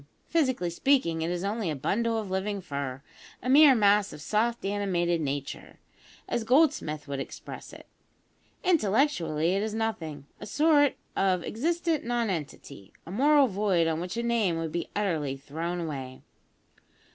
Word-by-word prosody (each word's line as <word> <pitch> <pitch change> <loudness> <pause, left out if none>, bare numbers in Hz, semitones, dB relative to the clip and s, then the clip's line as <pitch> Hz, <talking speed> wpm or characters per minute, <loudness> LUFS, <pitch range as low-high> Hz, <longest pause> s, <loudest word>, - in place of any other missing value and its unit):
Physically 260 - 0
speaking, 170 -6 +1
it 165 - -1
is 175 +1 -2
only 205 -2 -1
a 155 - -2
bundle 225 - 0
of 210 -4 -4
living 200 +2 -1
fur 140 -6 -5 0.4
a - - -4
mere 280 +1 +7
mass 205 -2 +3
of - - -9
soft 220 +8 0
animated 180 -4 0
nature, 140 -1 -5 0.5
as 235 - -1
Goldsmith 250 - +2
would 140 -1 -4
express - - -8
it. - - -13 0.8
Intellectually 200 - +2
it 195 - +1
is 215 0 -3
nothing 165 -11 -3
a 210 - -8
sort 290 +3 +3 0.2
of 185 -3 +1
existent 330 +5 -1
nonentity, 175 - -4
a 165 - -9
moral 285 +6 +5
void 195 -6 +1
on 160 -1 0
which 180 +5 -5
a 235 - -1
name 225 -8 +1
would 165 -1 -3
be 170 - -3
utterly 160 -10 -1
thrown 165 +6 -4
away. 135 -5 -6
195 Hz, 150 wpm, -28 LUFS, 160-235 Hz, 0.8 s, mere